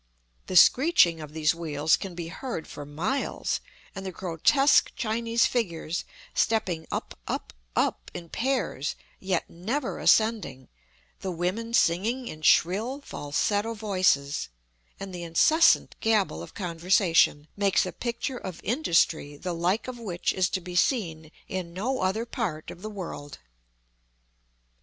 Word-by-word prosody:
The 185 - -4
screeching 180 - +6
of 150 -1 -8
these 155 0 +2
wheels 160 -2 +1
can 190 -3 -7
be 170 -1 -5
heard 230 -3 -5
for 145 -1 -8
miles, 180 - -2 0.3
and 195 - -7
the 190 - -4
grotesque 185 - +3
Chinese 230 +1 +1
figures 170 -8 -2 0.3
stepping 185 -8 0
up, - - -4
up, - - -4 0.2
up 60 - 0
in 170 - -8
pairs, 235 - -1 0.2
yet 190 -3 -1
never 230 - -3
ascending, 215 - +2 0.5
the 190 - -4
women 185 +7 -2
singing 230 +10 +2
in 155 - -8
shrill, 210 - +3
falsetto 205 - -1
voices, 185 - +1 0.5
and 195 -1 -7
the 175 - -6
incessant 310 - +4
gabble 210 - +1
of 85 - -10
conversation, 170 -3 +2
makes 200 -2 +2
a 185 - -4
picture 240 +2 -3
of 185 -3 -7
industry 165 - +1
the 180 +4 -4
like 180 +8 0
of 250 -1 -6
which 185 -7 -2
is 185 -1 +1
to 185 - -2
be 180 0 -8
seen 165 - 0 0.2
in 180 -3 -5
no 255 +8 -1
other 190 +5 0
part 205 - -4
of 175 - -12
the 215 - -5
world. 170 -8 -7
185 Hz, 140 wpm, -27 LUFS, 165-230 Hz, 0.5 s, screeching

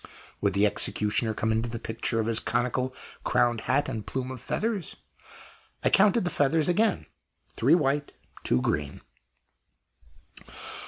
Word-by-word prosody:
Would 100 -1 +1
the 100 +1 +4
executioner 105 +1 +1
come 110 - 0
into 115 +2 0
possession 115 0 -3
of 110 - +1
his 115 0 +3
conical 125 +3 -1 0.3
crowned 120 -2 +2
hat 145 +3 +2
and 110 -2 -4
plume 130 +2 -4
of 130 -3 -7
feathers? 215 -7 -2 0.9
I - - +2
counted 205 +2 +4
the 175 - -2
feathers 150 +2 +2
again 215 +6 +1 0.5
three - - +4
white, 145 -3 0 0.3
two 65 - +1
green. 75 -1 -2
120 Hz, 130 wpm, -27 LUFS, 110-150 Hz, 0.9 s, the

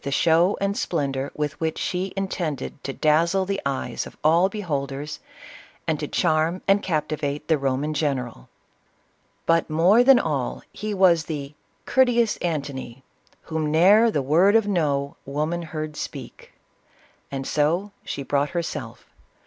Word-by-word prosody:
38 - - -29
the - - -1
show 170 +4 +3
and 200 0 0
splendor 140 -7 -2
with 150 -1 -3
which 160 -1 -1
she 185 +1 -2
intended 160 -8 -3
to 135 - -3
daz 155 +5 +2
zle 190 -1 +1
the 195 +1 -2
eyes 135 -1 -3
of - - -14
all 170 +5 +4
beholders, 150 -7 -4 0.7
and - - -1
to - - -3
charm 160 +3 +1
and 195 +1 +4
capti 155 -3 -1
vate 145 -1 -3
the 160 - +4
Roman 135 +3 -1
general. 130 - -2 1.0
But, 165 0 +2
more 180 +10 +5
than 270 0 +7
all, 140 - -2
he 210 -1 -4
was 175 -4 +4
the 145 -3 -5 0.2
" - - -42
courteous 240 -3 +3
Antony, 140 -6 -4 0.4
Whom 160 -1 -2
ne'er 200 +8 +6
the 145 -10 -1
word 175 +10 +4
of 225 -2 +4
No 145 -7 0
woman 155 +4 -3
beard 155 -1 -4
speak, - - -8 0.4
— - - -33
and 135 -1 -4
so 165 +9 0
she 140 - -5
brought 145 +1 0
herself. 170 - -5
155 Hz, 155 wpm, -24 LUFS, 140-185 Hz, 1.0 s, than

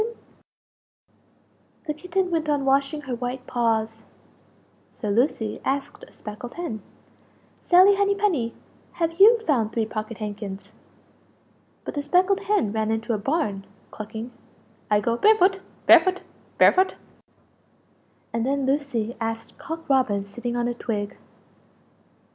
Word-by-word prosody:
The 300 - -2
Kitten 360 +3 -2
went 320 -2 0
on 285 -2 +1
washing 275 +2 +1
her 265 -3 -5
white 250 +1 -4
paws; 225 -2 -1 0.9
so 210 - -6
Lucie 225 -1 0
asked 275 +1 -3
a - - -20
speckled 215 +3 -9
hen 330 -12 -4 0.8
"Sally 370 +3 +7
Henny 400 0 +2
penny, 335 - 0 0.4
have 330 +1 -2
you 450 +4 +8
found 230 -8 +1
three 225 -1 0
pocket 215 0 -5
handkins?" 205 -2 -6 1.1
But - - -5
the 290 - -2
speckled 365 +6 +2
hen 400 - 0
ran 220 0 -1
into 225 +1 -1
a 215 - -1
barn, 210 -6 -1 0.3
clucking 220 +3 -7 0.6
"I 210 -1 +4
go 235 +3 0
barefoot, 390 - +4 0.3
barefoot, 370 -1 +6 0.3
barefoot!" 375 +1 +5 1.4
And 230 0 0
then 275 +1 0
Lucie 265 -5 -1
asked 225 0 -4
Cock 325 -1 -7
Robin 240 -8 +2
sitting 240 +4 -5
on 240 0 0
a 240 - -1
twig. 210 -4 -4
250 Hz, 125 wpm, -24 LUFS, 220-330 Hz, 1.4 s, you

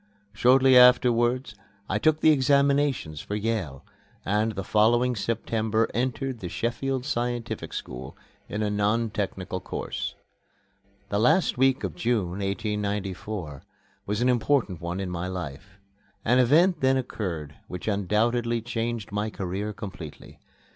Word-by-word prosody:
Shortly 130 +4 +5
afterwards 125 -1 +5 0.3
I - - 0
took 155 0 +2
my - - +7
examinations 140 - +2
for 105 - -5
Yale, 105 -10 -3 0.4
and 105 +3 +1
the 95 - -4
following 120 +5 +3
September 110 0 0
entered 130 +1 -2
the 90 - -5
Sheffield 125 +5 -2
Scientific 120 -3 -3
School, 65 +1 -7 0.3
in 105 +1 -2
a 105 - 0
non 105 +2 +1
technical 95 -3 -3
course. 65 -7 -5 0.9
The 100 - 0
last 125 - +3
week 130 +1 +2
of - - -2
June, 115 -6 0
1894, 100 -5 -3 0.5
was 105 +3 -1
an 125 - +3
important 120 - +1
one 85 +2 -3
in 95 -2 -3
my 90 +1 -3
life. 95 +1 -7 0.5
An 125 +3 +4
event 160 +8 +4
then 130 0 +3
occurred 85 - -4
which 90 - -7
undoubtedly 115 +4 +1
changed 115 -2 -3
my 105 +1 -1
career 100 +1 -4
completely. 95 -8 -9
110 Hz, 130 wpm, -26 LUFS, 100-125 Hz, 0.9 s, my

